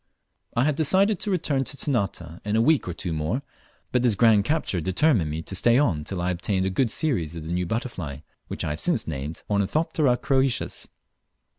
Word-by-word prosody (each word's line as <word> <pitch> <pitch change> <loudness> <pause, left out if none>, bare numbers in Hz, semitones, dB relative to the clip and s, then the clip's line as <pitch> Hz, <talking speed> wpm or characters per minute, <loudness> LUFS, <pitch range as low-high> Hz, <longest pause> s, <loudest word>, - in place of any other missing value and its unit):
I 120 - +4
had 150 0 +2
decided 190 +7 +2
to 210 - -2
return 155 -7 +1
to 140 - -7
Ternate 95 - -2
in 105 +1 -1
a - - +3
week 155 -3 +3
or 90 - -2
two 90 -4 -3
more, 80 - -2 0.5
but 125 - +2
this 120 -4 +3
grand 105 -1 +4
capture 150 - 0
determined 95 - +2
me 80 +2 -4
to 95 - -7
stay 120 +5 +4
on 85 - +1
till 95 +1 -4
I 90 - +1
obtained 95 +2 -1
a 95 - 0
good 115 +6 +1
series 105 - -1
of 80 -2 -7
the 85 - -3
new 90 0 -1
butterfly, 90 - -4 0.3
which - - -4
I - - -1
have 75 - -4
since - - +1
named 75 +1 -5
Ornithoptera 125 - +1
croesus. 135 -1 0
105 Hz, 200 wpm, -25 LUFS, 85-135 Hz, 0.5 s, I